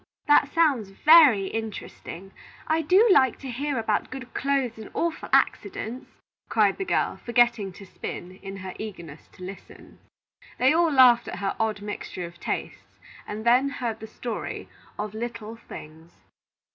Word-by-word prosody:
"That 290 -1 +5
sounds 285 - +2
very 280 -2 +6
interesting. 195 -3 -6 0.3
I 320 +1 +1
do 370 +9 +5
like 260 -8 +4
to 265 -2 -7
hear 280 +3 -2
about 220 -2 0
good 255 -1 -9
clothes 270 -5 -1
and 220 - -9
awful 335 -1 -2
accidents," 260 - 0 0.4
cried 210 -3 +2
the 385 - -2
girl, - - 0
forgetting 235 -4 +2
to 195 - -12
spin, 185 0 -8
in 195 0 -8
her 185 -1 -7
eagerness 170 -8 -8
to 185 - -12
listen. 190 +2 -11 0.6
They 260 +3 +4
all 335 0 +3
laughed 255 -4 +6
at - - -5
her 195 -1 -2
odd 215 -2 -1
mixture 205 -3 -5
of 170 0 -12
tastes, - - -5 0.3
and 215 +2 -6
then 250 +4 +4
heard 235 -5 -4
the 220 - -8
story 230 +1 -5 0.3
of 210 0 -4
LITTLE 230 -1 -6
THINGS. 160 +2 -11
225 Hz, 155 wpm, -25 LUFS, 200-275 Hz, 0.6 s, very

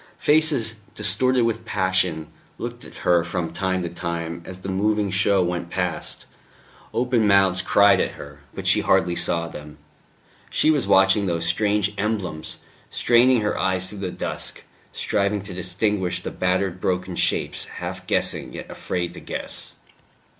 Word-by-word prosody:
Faces, 145 -8 +2 0.2
distorted 130 -1 +3
with 115 0 -1
passion, 95 -5 0 0.3
looked - - -6
at - - -12
her 85 -1 +4
from 85 -1 -3
time 95 0 -1
to 85 - -3
time 85 -1 -4
as 95 0 -9
the 95 - -6
moving 100 +1 +1
show 95 0 +3
went 85 -1 -3
past, 90 -2 -3 0.7
open 120 -2 +1
mouths 95 -2 +4
cried 100 0 +5
at - - 0
her; 70 0 -11 0.2
but - - -6
she - - +5
hardly 85 0 +2
saw 85 -1 +1
them. 75 -1 -10 0.7
She 155 - +3
was 145 -9 +1
watching 95 +1 +5
those 85 -2 -1
strange 105 +3 +1
emblems, 100 -7 -3 0.3
straining 120 0 +4
her 105 - 0
eyes 95 -1 0
through 105 - -8
the 95 -2 -3
dusk, - - -4 0.3
striving 100 0 0
to 100 - -8
distinguish 95 +1 -1
the - - -5
battered 90 0 0
broken 90 0 -1
shapes, - - 0
half - - -7
guessing, - - 0
yet - - -8
afraid 85 -1 -3
to - - -9
guess. - - -5
95 Hz, 155 wpm, -23 LUFS, 90-105 Hz, 0.7 s, cried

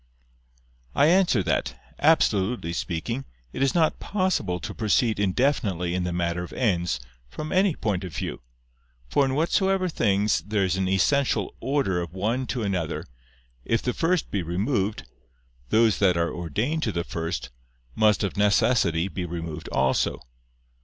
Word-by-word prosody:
I 140 - +5
answer 175 - +3
that, 80 -2 -1 0.2
Absolutely 110 - +2
speaking, 95 +10 -3 0.3
it - - -4
is 135 +4 +2
not 160 -2 +2
possible 185 - -1
to - - -6
proceed 110 0 +1
indefinitely 100 - +1
in 90 0 -1
the 90 - -2
matter 85 0 -1
of 90 - -9
ends, 85 - 0 0.3
from 155 - -6
any 190 -3 +3
point 100 -4 -1
of 90 -6 -7
view. - - -4 0.7
For 140 - +3
in 130 0 -1
whatsoever 185 +4 +2
things 105 - +1
there 105 -1 -1
is 90 -1 0
an 95 0 0
essential 130 +9 +1
order 130 -11 0
of 85 0 -7
one 115 +7 -1
to 120 -1 -2
another, 90 -6 -2 0.6
if 115 - 0
the 125 - 0
first 170 0 0
be 100 - 0
removed, 95 - -1 0.7
those 110 - +3
that 95 -4 +3
are 85 0 0
ordained 105 - -2
to 110 - 0
the 85 -3 -2
first, 80 -9 -4 0.4
must 105 +6 +3
of 100 - -2
necessity 100 -4 +2
be 95 -1 -5
removed 80 -2 -6
also. 65 0 +1
100 Hz, 155 wpm, -25 LUFS, 90-130 Hz, 0.7 s, I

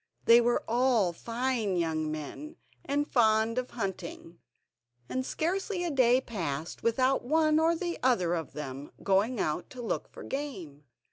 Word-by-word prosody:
They 235 +1 +8
were 240 0 +1
all 235 -6 +2
fine 230 -1 -1
young 160 -2 -1
men, 155 - -6 0.3
and 290 +1 0
fond 225 0 +3
of 255 - -5
hunting, 185 -5 -6 0.7
and 260 - -2
scarcely 360 +6 -2
a 345 - -1
day 255 -2 +4
passed 165 - -4
without 255 +3 +2
one 310 +3 +3
or 330 +1 +3 0.3
other 190 -10 +2
of 165 -2 -3
them 140 -1 -6
going 205 +5 +2
out 155 +1 -1
to 250 - -8
look - - -2
for - - -10
game. 190 - -6
230 Hz, 145 wpm, -29 LUFS, 175-265 Hz, 0.7 s, They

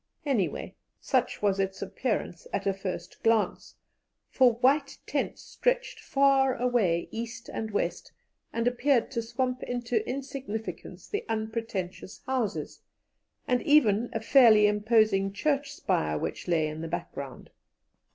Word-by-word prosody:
Anyway, 245 -11 -1 0.3
such - - 0
was 200 -1 +2
its 190 0 -1
appearance 195 -3 -3
at 200 0 -2
a 195 - +2
first 185 -2 -6
glance, 225 -2 +1 0.6
for 255 -3 +5
white 275 +5 +2
tents - - -2
stretched - - -1
far 275 - +3
away 225 -9 +1
east 230 +1 -6
and 220 - -4
west, 205 - -2 0.4
and 230 +1 -1
appeared 245 0 +2
to 235 -3 -1
swamp 250 +2 -2
into 240 -2 -1
insignificance 260 -5 -6
the 420 +2 -3
unpretentious 220 -4 -4
houses, 255 -6 -2 0.7
and 250 -1 +2
even 240 -7 +4
a 225 - -2
fairly 225 -2 +6
imposing 210 -2 +3
church 280 +6 0
spire 75 - 0
which - - -4
lay 165 -3 +2
in 155 +1 -6
the 165 - -4
background. 140 -5 -6
225 Hz, 130 wpm, -28 LUFS, 195-260 Hz, 0.7 s, fairly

